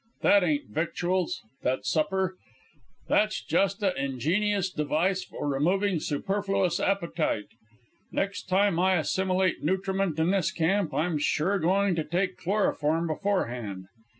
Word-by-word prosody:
That 200 Hz, -2 st, +5 dB
ain't 150 Hz, -9 st, -1 dB
victuals, 175 Hz, -, -1 dB, 0.2 s
that 130 Hz, +1 st, -1 dB
supper. 185 Hz, +3 st, 0 dB, 0.7 s
That's 215 Hz, 0 st, +2 dB
just 200 Hz, +2 st, +1 dB
a' 190 Hz, -2 st, +2 dB
ingenious 180 Hz, -, 0 dB
device 170 Hz, +5 st, 0 dB
for -, -, -6 dB
removing 175 Hz, +7 st, +1 dB
superfluous 195 Hz, +4 st, -1 dB
appetite. 170 Hz, -, -1 dB, 0.6 s
Next 195 Hz, -1 st, -3 dB
time 195 Hz, -2 st, +3 dB
I 185 Hz, +1 st, +3 dB
assimilate 185 Hz, +3 st, 0 dB
nutriment 190 Hz, 0 st, 0 dB
in 160 Hz, +3 st, +2 dB
this 195 Hz, -4 st, +1 dB
camp 175 Hz, +1 st, +1 dB
I'm 155 Hz, +3 st, 0 dB
sure 180 Hz, +7 st, +1 dB
going 190 Hz, +3 st, +2 dB
to 165 Hz, -2 st, -1 dB
take 185 Hz, +3 st, -1 dB
chloroform 165 Hz, -4 st, 0 dB
beforehand. 125 Hz, -, -2 dB
180 Hz, 125 wpm, -27 LUFS, 155-195 Hz, 0.7 s, That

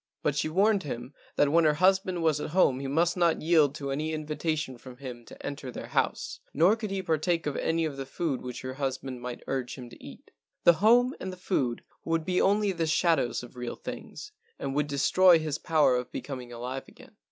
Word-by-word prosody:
But 145 Hz, -, +1 dB
she 155 Hz, -, 0 dB
warned 200 Hz, +4 st, +3 dB
him 125 Hz, -3 st, -6 dB, 0.2 s
that 145 Hz, -1 st, +3 dB
when 170 Hz, +1 st, +5 dB
her 155 Hz, -1 st, +4 dB
hus¬ 190 Hz, +3 st, +4 dB
band 180 Hz, -3 st, -3 dB
was 155 Hz, -2 st, +2 dB
at -, -, -4 dB
home 130 Hz, -8 st, +4 dB
he 135 Hz, -, -4 dB
must 170 Hz, +5 st, +2 dB
not 170 Hz, -4 st, +2 dB
yield 155 Hz, -4 st, +4 dB
to 140 Hz, -2 st, -4 dB
any 155 Hz, +3 st, -2 dB
invi¬ 155 Hz, -1 st, -4 dB
tation 155 Hz, -7 st, -2 dB
from 125 Hz, 0 st, -12 dB
him 125 Hz, -3 st, -8 dB
to -, -, -12 dB
enter 140 Hz, -2 st, -5 dB
their -, -, -7 dB
house, -, -, -1 dB, 0.2 s
nor 175 Hz, +8 st, +5 dB
could 220 Hz, -2 st, -5 dB
he 195 Hz, -1 st, -3 dB
partake 165 Hz, +1 st, 0 dB
of 145 Hz, -, -2 dB
any 165 Hz, 0 st, 0 dB
of 145 Hz, -3 st, -4 dB
the 135 Hz, -1 st, -5 dB
food 140 Hz, -1 st, -2 dB
which 125 Hz, -1 st, -6 dB
her 130 Hz, 0 st, -5 dB
husband 130 Hz, -2 st, -4 dB
might 125 Hz, 0 st, -6 dB
urge 130 Hz, -2 st, -3 dB
him 125 Hz, -3 st, -10 dB
to -, -, -14 dB
eat. -, -, -12 dB, 0.3 s
The 175 Hz, -, +8 dB
home 245 Hz, +4 st, +5 dB
and 190 Hz, -, -4 dB
the 185 Hz, -, -9 dB
food 135 Hz, -10 st, -1 dB, 0.2 s
would 165 Hz, -1 st, -1 dB
be 180 Hz, -1 st, +1 dB
only 205 Hz, +1 st, +3 dB
the 170 Hz, -3 st, -1 dB
shadows 155 Hz, -6 st, +2 dB
of 125 Hz, -, -12 dB
real 125 Hz, -1 st, -5 dB
things, 420 Hz, -, -8 dB, 0.3 s
and 135 Hz, -, -4 dB
would 150 Hz, +1 st, 0 dB
destroy 170 Hz, +5 st, +5 dB
his 155 Hz, -2 st, -3 dB
power 155 Hz, -6 st, +3 dB
of 125 Hz, 0 st, -3 dB
becoming 130 Hz, -4 st, -6 dB
alive 125 Hz, +3 st, -5 dB
again. -, -, -17 dB
150 Hz, 225 wpm, -28 LUFS, 130-175 Hz, 0.3 s, The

